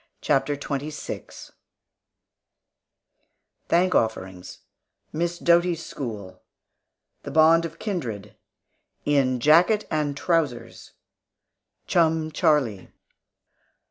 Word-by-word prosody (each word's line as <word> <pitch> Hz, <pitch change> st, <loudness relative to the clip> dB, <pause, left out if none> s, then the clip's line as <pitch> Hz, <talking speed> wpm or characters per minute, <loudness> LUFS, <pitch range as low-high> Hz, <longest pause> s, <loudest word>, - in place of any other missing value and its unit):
CHAPTER 145 Hz, 0 st, 0 dB
XXVI 145 Hz, +1 st, -6 dB, 2.2 s
THANK 180 Hz, +2 st, +2 dB
OFFERINGS 95 Hz, -5 st, -2 dB, 0.5 s
MISS 170 Hz, +2 st, -2 dB
DOTY'S 170 Hz, -1 st, +2 dB
SCHOOL 105 Hz, -8 st, -7 dB, 0.8 s
THE -, -, -8 dB
BOND 165 Hz, +1 st, +4 dB
OF 165 Hz, 0 st, -8 dB
KINDRED 125 Hz, -, -5 dB, 0.7 s
IN 135 Hz, -3 st, +2 dB
JACKET 175 Hz, -, +4 dB
AND 150 Hz, -2 st, -1 dB
TROUSERS 140 Hz, -9 st, -2 dB, 0.9 s
CHUM 160 Hz, -2 st, +1 dB
CHARLIE. 145 Hz, -, +1 dB
150 Hz, 75 wpm, -24 LUFS, 130-165 Hz, 2.2 s, BOND